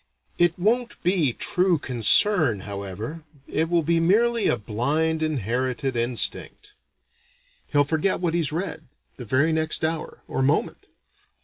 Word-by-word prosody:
It 175 -1 +3
won't 235 +6 0
be 175 -7 +2
true 180 +7 +1
concern, 130 - +2
however, 100 - -6 0.2
it 160 +1 -1
will 170 -1 +2
be 165 +2 +2
merely 225 +7 +2
a - - +2
blind 145 +10 -1
inherited 130 -2 -1
instinct. 120 - -3 0.9
He'll 145 -1 +3
forget 160 +6 0
what 175 -2 -1
he's 165 -4 0
read, 160 -1 -4 0.3
the 125 - -8
very 135 +9 +2
next 160 0 +1
hour, 160 0 -4
or - - -2
moment. 135 +2 0
160 Hz, 130 wpm, -24 LUFS, 125-175 Hz, 0.9 s, It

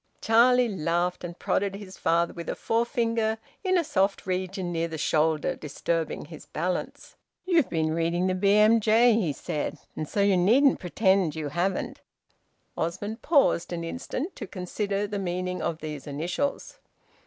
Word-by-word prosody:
Charlie 245 +2 +4
laughed, 175 -2 -1
and 175 0 -6
prodded 200 0 0
his 195 -2 -9
father 170 +1 +1
with 170 -1 -7
a - - -2
forefinger 230 -1 0 0.3
in 370 -1 +2
a 345 - +2
soft 200 -9 0
region 185 -1 -2
near 165 0 -1
the 160 -1 -6
shoulder, 155 +1 +1
disturbing 160 +2 -3
his 155 0 -12
balance. 180 +3 -4 0.3
"You've 340 -6 +3
been 160 -1 0
reading 170 +2 0
the 185 - +1
`BMJ,'" 215 +4 +5
he 165 -6 0
said, 145 +1 -4 0.2
"and 155 - -4
so 205 - 0
you 200 -2 +4
needn't 250 +10 +4
pretend 190 -3 +2
you 155 -2 -3
haven't!" 180 +5 -2 0.7
Osmond 205 +7 -3
paused 280 - +3
an 170 -1 -3
instant 255 - -4
to 210 - -6
consider 200 +2 -2
the 205 0 -4
meaning 180 0 -3
of 165 -1 -3
these 150 -2 -6
initials. 170 - -3
185 Hz, 155 wpm, -27 LUFS, 170-220 Hz, 0.7 s, `BMJ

